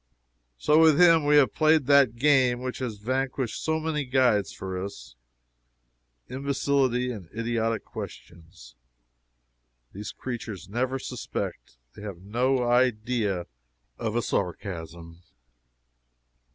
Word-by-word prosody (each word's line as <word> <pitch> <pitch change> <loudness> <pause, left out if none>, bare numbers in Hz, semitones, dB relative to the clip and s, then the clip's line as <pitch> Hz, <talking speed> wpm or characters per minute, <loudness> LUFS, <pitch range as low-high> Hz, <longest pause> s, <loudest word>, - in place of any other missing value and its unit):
So 150 - +3
with 160 -1 +6
him 165 -4 +6
we 150 0 +4
have 135 -7 +4
played 155 -2 +3
that 140 -4 +5
game 130 -2 +3
which 130 0 -4
has 120 -5 -4
vanquished 130 +2 -2
so 160 0 0
many 155 -2 -2
guides 125 -6 +2
for 95 -1 -5
us 65 -11 -9 1.1
imbecility 135 -1 0
and 100 -8 -9
idiotic 115 -1 -1
questions. 85 -6 -10 1.2
These 105 +2 -6
creatures 115 -7 -6
never 125 +6 -1
suspect - - -6 0.2
they - - -12
have 100 -4 -6
no 125 +5 +1
idea 115 -6 +1 0.5
of 110 -1 -2
a 120 - +1
sarcasm. 85 -4 -4
120 Hz, 110 wpm, -26 LUFS, 100-135 Hz, 1.2 s, with